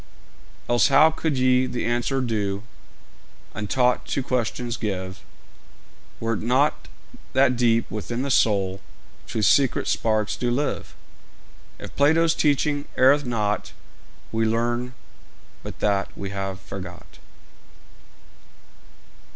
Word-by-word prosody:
Else 120 0 +4
how 150 +3 +6
could 160 -3 -2
ye 130 0 +3
the 125 - -3
answer 120 +3 0
due 105 -4 -2 0.9
Untaught 125 +4 +1
to 135 - -1
questions 120 -1 -2
give, 95 -5 -4 1.0
Were't 115 -2 -2
not 130 +6 +1 0.5
that 130 -1 +4
deep 115 -1 +2
within 115 +4 -3
the 140 - -2
soul 95 -5 +2 0.5
Truth's 110 -4 0
secret 135 -3 +2
sparks 110 -2 0
do 120 - -2
live? 135 +4 -2 0.8
If - - -10
Plato's 160 +3 +4
teaching 145 0 +1
erreth 140 +3 +5
not, 105 -4 -2 0.6
We 115 0 0
learn 120 +3 -1 0.7
but - - -9
that 100 -2 +1
we 100 -1 -5
have 95 -1 -4
forgot. - - -10
120 Hz, 110 wpm, -24 LUFS, 110-135 Hz, 1.0 s, how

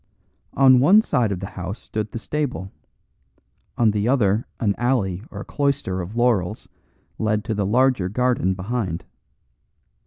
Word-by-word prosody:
On 130 -2 +6
one 195 - +6
side 115 - +1
of 95 -2 -3
the - - -3
house 95 +3 -5
stood 105 -1 -5
the - - -5
stable, 125 -7 -3 1.1
on 115 -3 +4
the 105 +1 -1
other 110 -4 +2
an 105 -4 +1
alley 110 -8 0
or 100 -2 -7
cloister 140 -10 -1
of 90 +6 -7
laurels 110 -4 0 0.5
led 105 -1 0
to 110 - -2
the 100 -2 -1
larger 125 -4 +2
garden 120 -4 +1
behind. 95 -3 -3
110 Hz, 145 wpm, -22 LUFS, 95-125 Hz, 1.1 s, On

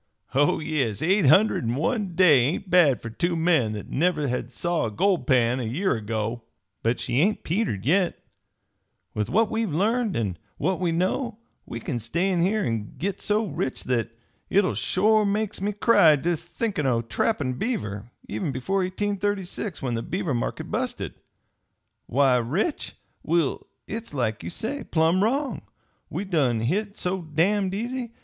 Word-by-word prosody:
"Oh, 145 +2 +3
yes, 145 -9 -1
eight 190 -1 +3
hundred 195 +7 +5
in 115 +1 -1
one 190 - -1
day 170 -7 +6
ain't 150 +9 -1
bad 165 -8 +5
for 115 - -5
two 170 +9 -1
men 160 -10 +2
that 105 - -6
never 155 -2 +1
had 125 -1 -3
saw 170 +3 -1
a - - -5
gold 180 - +1
pan 125 -2 +3
a - - -2
year 145 - 0
ago. 110 +1 -3 0.4
But 115 +2 0
she 125 - 0
ain't 200 +7 +2
petered 165 - -1
yit. 180 +5 +2 1.0
With 105 -1 -2
what 220 +3 +2
we've 220 -4 -1
learned, 215 +6 +1
an' 100 -7 -2 0.2
what 190 -1 0
we 175 -2 +1
know, 200 +7 -1 0.3
we - - -5
kin 135 -9 -3
stay 170 - 0
in 175 -2 +1
here 205 +4 +2
an' 110 -2 -3
git 195 +3 -2
so 210 +2 +1
rich 140 -7 -3
that 115 -2 -2 0.3
hit 195 -2 +2
shore 215 +3 +3
makes 205 -1 -1
me 205 +1 0
cry 205 -7 +5
ter 170 +5 0
think 190 +4 -4
o' 125 -5 +1
trappin' 130 - 0
beaver, 110 - -3 0.2
even 170 -7 -2
before 135 +10 -1
1836, 195 -1 -2
when 125 -2 -1
the 115 - -1
beaver 180 - -2
market 120 - -3
busted. - - -2 0.9
Why, 130 0 +3
rich? 155 - -2 0.3
Will, 165 -3 0 0.2
hit's 225 -7 -6
like 110 -5 -1
you 85 - -5
say, 270 - -4
plumb 165 +4 +2
wrong 270 +6 0 0.5
we 205 - -3
done 135 - +1
hit 200 - -1
so 185 +1 -2
damned 185 +5 +1
easy! 240 +2 -4
170 Hz, 165 wpm, -25 LUFS, 125-200 Hz, 1.0 s, day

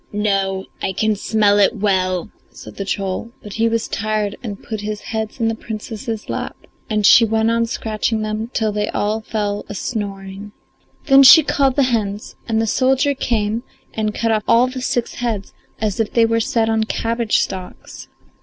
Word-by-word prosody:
"No, 195 -2 0 0.2
I 190 - -1
can 215 +3 +1
smell 205 0 +2
it 200 +3 +4
well," 185 -3 0 0.2
said - - -12
the 195 - -3
troll; 195 +4 -3
but 210 - -8
he 225 +2 +1
was 230 0 -1
tired 215 -1 -2
and 210 -5 -7
put 220 -2 -5
his 210 0 -4
heads 220 +1 -4
in 225 - +1
the 225 - +1
Princess's 220 0 -6
lap, - - -4 0.3
and 215 -1 +1
she 235 - +8
went 220 0 +2
on 230 0 +1
scratching 220 -1 -2
them 215 +1 -3
till 220 -4 0
they 210 0 -1
all 215 +2 -1
fell 205 -2 -2
a 205 - -5
snoring. 200 -1 -5 0.5
Then 275 -2 +7
she 275 +4 +9
called 275 -2 +1
the 280 - +4
hens, 205 -2 -2
and 225 -1 +1
the 225 - +1
soldier 265 +5 +2
came 225 -4 -1 0.3
and 215 -1 -1
cut 230 0 0
off 215 -1 +1
all 235 +2 +5
the 255 0 -5
six 240 -1 -1
heads 225 -5 -3 0.3
as 215 -2 -2
if 225 - 0
they 230 -1 +5
were 230 0 +1
set 225 0 +1
on 220 0 +1
cabbage 230 0 0
stalks. 185 -2 -5
220 Hz, 185 wpm, -19 LUFS, 205-230 Hz, 0.5 s, she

